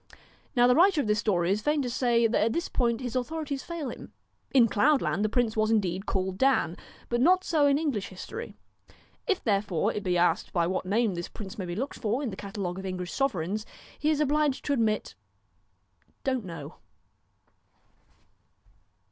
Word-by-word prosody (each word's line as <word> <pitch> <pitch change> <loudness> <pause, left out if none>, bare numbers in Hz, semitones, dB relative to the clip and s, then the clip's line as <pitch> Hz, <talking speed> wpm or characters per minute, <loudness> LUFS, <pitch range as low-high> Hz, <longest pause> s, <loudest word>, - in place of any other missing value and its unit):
Now 245 -1 +5
the 250 - +6
writer 350 +3 +5
of 285 - +1
this 210 0 +1
story 180 -5 +1
is 210 +2 +1
fain 295 +3 +1
to 250 - -2
say 235 -2 +2
that 225 -1 +2
at 225 +1 +1
this 340 - -1
point 235 -2 0
his 245 -2 -4
authorities 280 +1 -2
fail 330 -6 -5
him. - - -11 0.4
In 255 -4 +6
Cloudland 265 -2 +2
the 215 - +1
prince 230 -1 +1
was 215 0 +2
indeed 195 -3 0
called 190 0 -2
Dan, 260 -11 +3 0.3
but 240 0 0
not 370 +6 +5
so 305 -5 +3
in 280 0 +4
English 280 -10 -1
history. 445 - -8 0.7
If 400 -5 0
therefore 200 -6 +1
it 210 - -3
be 180 -2 0
asked 175 0 +1
by 170 -2 +2
what 185 +1 -2
name 215 +1 +2
this 175 0 -5
prince 210 +1 -9
may 190 - -3
be 175 -1 -4
looked 265 +8 -4
for 235 +4 -1
in 245 - -2
the - - -6
cata 200 +1 -8
e 195 - -1
of 180 +2 -4
English 180 -2 -4
sovereigns, 210 - -1 0.4
he 305 - +1
is 305 -2 +2
obliged 300 -1 +1
to 285 - +1
admit 220 -5 0 1.1
on't 260 -5 0
know.' 165 -4 -8
225 Hz, 190 wpm, -28 LUFS, 190-275 Hz, 1.1 s, the